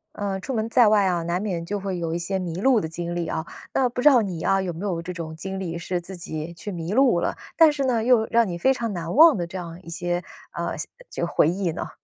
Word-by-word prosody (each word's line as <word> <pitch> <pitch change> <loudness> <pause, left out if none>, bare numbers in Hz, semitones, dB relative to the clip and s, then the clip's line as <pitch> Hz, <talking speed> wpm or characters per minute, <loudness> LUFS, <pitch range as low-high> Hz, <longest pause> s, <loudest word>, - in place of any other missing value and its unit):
呃， 195 -2 -2
出 265 - -5
门 220 0 0
在 235 -1 +5
外 210 -2 +4
啊， 175 -2 +1
难 170 +2 -1
免 180 -5 -3
就 205 +3 -3
会 190 -2 -3
有 165 -1 -2
一 - - -1
些 190 +3 -2
迷 175 -3 -4
路 245 +1 +4
的 160 - -3
经 170 +1 -4
历 170 -1 -2
啊， 160 - -3 0.3
那 265 - +3
不 245 +1 -4
知 295 - +8
道 255 -4 +5
你 185 -6 -4
啊， 195 - +3
有 180 -2 -3
没 165 - -9
有 175 -4 -1
这 180 +2 -6
种 165 -3 -6
经 190 +4 -5
历 170 -3 -4
是 175 +1 -3
自 185 +2 -9
己 160 -1 -6
去 190 +4 -7
迷 170 +1 -4
路 255 -8 +4
了， - - -2 0.2
但 325 -2 +7
是 285 -2 -2
呢， 240 -4 +1
又 235 -2 +4
让 230 -1 +4
你 175 -2 -4
非 265 +10 +3
常 235 -3 -3
难 170 0 -4
忘 315 -1 +8
的 175 - -2
这 180 +3 -11
样 170 -1 -7
一 165 - -11
些， 175 +1 -2 0.3
呃， - - -3
像 - - -4 0.2
就 - - -2
回 150 - +3
忆 180 +1 0
呢？ - - -5
185 Hz, 300 characters per minute, -24 LUFS, 170-220 Hz, 0.3 s, 知